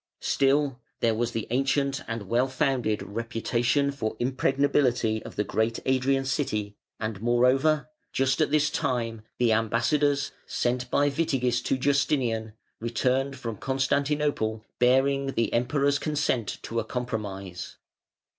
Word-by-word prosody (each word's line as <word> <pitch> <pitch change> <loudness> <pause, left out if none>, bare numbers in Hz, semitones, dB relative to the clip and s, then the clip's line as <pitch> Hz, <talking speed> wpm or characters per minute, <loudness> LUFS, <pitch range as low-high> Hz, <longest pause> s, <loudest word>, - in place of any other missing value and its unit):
Still 140 -1 +2 0.2
there 115 -1 +2
was 120 +2 -1
the 115 - -2
ancient 135 +2 +1
and 115 -3 -4
well 120 +5 +2
founded 130 -5 0
reputation 120 +5 0
for 115 -6 -3
impregnability 130 -3 +1
of - - -10
the 105 - +1
great 110 +2 0
Adrian 135 +1 +2
city, 105 -7 -1 0.2
and, 110 -2 -4
moreover, 130 +6 +3 0.2
just 135 0 +1
at - - +3
this 150 0 +2
time 115 -3 -1 0.2
the 120 -2 +3
ambassadors, 140 +6 +1 0.2
sent 125 0 -1
by 145 - +3
Witigis 135 -6 0
to 135 - +1
Justinian, 130 -5 +1 0.3
returned 130 +4 0
from 115 -4 -5
Constantinople, 135 -4 0
bearing 135 +2 +3
the 115 - 0
Emperor's 140 +4 +2
consent 145 -8 -1
to 115 - -2
a - - -1
compromise. 105 -7 -5
125 Hz, 125 wpm, -27 LUFS, 115-140 Hz, 0.3 s, moreover